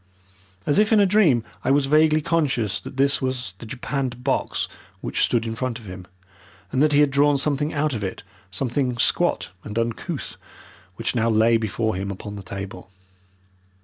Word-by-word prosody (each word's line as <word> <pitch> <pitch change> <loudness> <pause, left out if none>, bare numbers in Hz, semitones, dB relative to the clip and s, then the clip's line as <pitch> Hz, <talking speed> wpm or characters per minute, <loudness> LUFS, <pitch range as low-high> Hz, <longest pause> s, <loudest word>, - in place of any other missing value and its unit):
As 145 - +3
if 215 +1 +3
in 220 - +6
a 200 - +6
dream 180 - +4 0.2
I - - 0
was 140 0 +4
vaguely 155 +2 +4
conscious 135 - 0
that 130 - -10
this 140 +1 +3
was 130 -6 -2
the 115 - -9
japanned 125 0 -3
box 135 - 0 0.3
which - - -1
stood 115 -1 +2
in 115 - -3
front 125 0 -3
of 115 - -13
him, 90 -1 -9 0.6
and 130 - +1
that 155 0 +4
he 145 0 +5
had 145 -2 +3
drawn 145 +1 +4
something 145 +2 0
out 150 -1 0
of 110 -4 -3
it, 95 - -4 0.3
something 125 +4 -1
squat 115 - +1
and 105 +1 -6
uncouth, 120 +7 -3 0.6
which 115 - -2
now 115 -2 +1
lay 110 +1 +4
before 110 0 0
him 95 +2 -3
upon 100 +1 -6
the 100 - -7
table. 95 +1 -7
125 Hz, 180 wpm, -23 LUFS, 110-145 Hz, 0.6 s, in